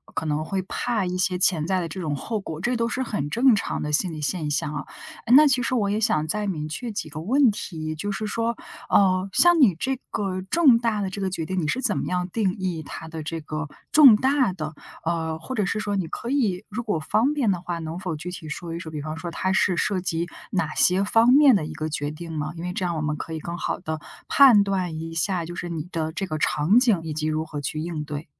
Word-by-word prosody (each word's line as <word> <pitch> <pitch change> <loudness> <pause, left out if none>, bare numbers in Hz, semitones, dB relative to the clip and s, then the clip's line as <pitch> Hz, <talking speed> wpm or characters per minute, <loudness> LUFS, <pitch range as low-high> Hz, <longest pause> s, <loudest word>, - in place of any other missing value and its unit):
可 160 - -2
能 150 +1 0
会 195 +1 -2
怕 210 +1 -1
一 180 0 -2
些 185 0 +1
潜 165 -4 +2
在 190 -1 +1
的 170 - -2
这 185 +4 -7
种 150 -3 -2
后 215 - -3
果， 160 -4 -6
这 245 +5 0
都 230 0 +1
是 260 - -2
很 145 - -3
正 245 +1 +5
常 - - -2
的 150 - -3
心 170 +3 +1
理 155 - -6
现 150 0 -2
象 145 +1 -1
啊。 145 - -4 0.4
哎， 240 - +3
那 300 +1 +8
其 255 -2 +2
实 260 - -1
我 205 -4 +1
也 210 +2 0
想 160 -9 +1
再 210 +5 -1
明 155 -5 -3
确 230 +9 -5
几 180 -6 -5
个 150 - -7
问 255 - +4
题， 155 -5 -5
就 205 +6 -3
是 215 +2 -3
说， 230 +2 -1 0.3
呃， 185 -1 +3
像 345 -2 +5
你 195 -10 +6
这 265 +10 -1 0.2
个 190 -2 -2
重 260 - +5
大 225 -3 0
的 190 - -1
这 200 - -5
个 190 - 0
决 165 -3 -4
定， 185 +2 -2
你 150 - -1
是 260 - 0
怎 220 -6 0
么 - - -2
样 180 0 -1
定 195 -2 0
义 180 -4 -2
它 160 - -8
的 160 -1 -6
这 165 +2 -4
个 155 0 -4 0.2
重 275 -8 +9
大 260 -2 +2
的？ 155 -3 -5 0.3
呃， 160 -1 -1
或 165 +11 -7
者 210 -5 0
是 215 - -1
说 205 -1 -2
你 185 -4 -1
可 235 - -6
以 215 -9 0
如 220 +4 -3
果 205 -8 -1
方 235 - +1
便 240 -8 +2
的 175 -2 -2
话， 175 -1 -4
能 165 +2 -5
否 180 -4 -3
具 170 +4 -6
体 160 -4 -8
说 165 +2 -5
一 170 - -4
说， 160 -3 -8
比 150 -2 -5
方 155 0 -4
说 170 +1 -5
它 185 +3 -1
是 180 -2 +2
涉 190 -3 0
及 170 -1 -1 0.2
哪 160 -5 -1
些 185 +2 +3
方 225 +4 +4
面 275 -3 +7
的 155 -5 -1
一 - - -7
个 155 - -3
决 145 -1 -3
定 165 +2 -8
吗？ 155 +1 -3
因 165 - -6
为 180 0 -3
这 185 - -3
样， 175 -2 -1
我 - - -2
们 150 0 -1
可 165 - -7
以 160 - -3
更 170 +2 -5
好 - - -2
地 160 -3 -5 0.3
判 245 -8 +7
断 185 -5 -2
一 165 0 -6
下， 170 +1 -1
就 175 - -7
是 175 - -5
你 160 -3 -3
的 160 -2 -2
这 195 +4 -3
个 155 -3 -4
场 165 +13 +3
景， 230 -9 +3
以 155 -2 -4
及 155 0 -2
如 155 +1 -1
何 150 -2 -6
去 155 +2 -3
应 160 -2 -3
对。 150 +1 -5
180 Hz, 285 characters per minute, -24 LUFS, 160-210 Hz, 0.4 s, 重